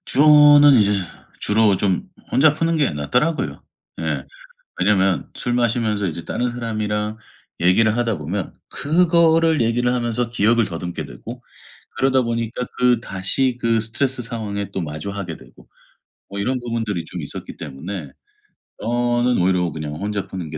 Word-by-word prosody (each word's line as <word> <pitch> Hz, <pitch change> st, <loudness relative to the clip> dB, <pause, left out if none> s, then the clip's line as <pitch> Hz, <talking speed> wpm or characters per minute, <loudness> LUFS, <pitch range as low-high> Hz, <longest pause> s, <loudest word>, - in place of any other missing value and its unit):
주로는 145 Hz, 0 st, +7 dB
이제 105 Hz, -3 st, +4 dB, 0.5 s
주로 105 Hz, -1 st, +3 dB
좀 100 Hz, -, -1 dB, 0.2 s
혼자 145 Hz, +2 st, +5 dB
푸는 165 Hz, +1 st, 0 dB
게 150 Hz, -3 st, +2 dB
낫더라고요. 125 Hz, -, -1 dB, 0.4 s
예. -, -, -2 dB, 0.5 s
왜냐하면 95 Hz, -3 st, +2 dB
술 120 Hz, -, -2 dB
마시면서 115 Hz, -4 st, +1 dB
이제 85 Hz, 0 st, -5 dB
다른 125 Hz, 0 st, -2 dB
사람이랑 110 Hz, -3 st, -3 dB, 0.4 s
얘기를 105 Hz, +6 st, +3 dB
하다 115 Hz, -6 st, 0 dB
보면 85 Hz, +5 st, -4 dB
그거를 165 Hz, -2 st, +3 dB
얘기를 120 Hz, +2 st, +1 dB
하면서 120 Hz, -1 st, -1 dB
기억을 115 Hz, 0 st, +2 dB
더듬게 85 Hz, +1 st, -5 dB
되고 -, -, -10 dB, 0.5 s
그러다 135 Hz, 0 st, +3 dB
보니까 115 Hz, +1 st, -3 dB
그 125 Hz, -2 st, +3 dB
다시 120 Hz, +5 st, -1 dB
그 115 Hz, -1 st, +2 dB
스트레스 125 Hz, +4 st, -2 dB
상황에 105 Hz, -3 st, -4 dB
또 95 Hz, -, -2 dB
마주하게 85 Hz, +3 st, -5 dB
되고 -, -, -18 dB, 0.6 s
뭐 100 Hz, -, -6 dB
이런 130 Hz, +6 st, 0 dB
부분들이 115 Hz, -7 st, -3 dB
좀 -, -, -7 dB
있었기 -, -, -8 dB
때문에 80 Hz, +1 st, -7 dB, 0.7 s
저는 120 Hz, +1 st, +1 dB
'오히려 90 Hz, -2 st, +2 dB
그냥 75 Hz, -1 st, -5 dB
혼자 100 Hz, +4 st, -3 dB
푸는 90 Hz, -5 st, -6 dB
게 80 Hz, -, -6 dB
115 Hz, 320 characters per minute, -21 LUFS, 95-125 Hz, 0.7 s, 주로는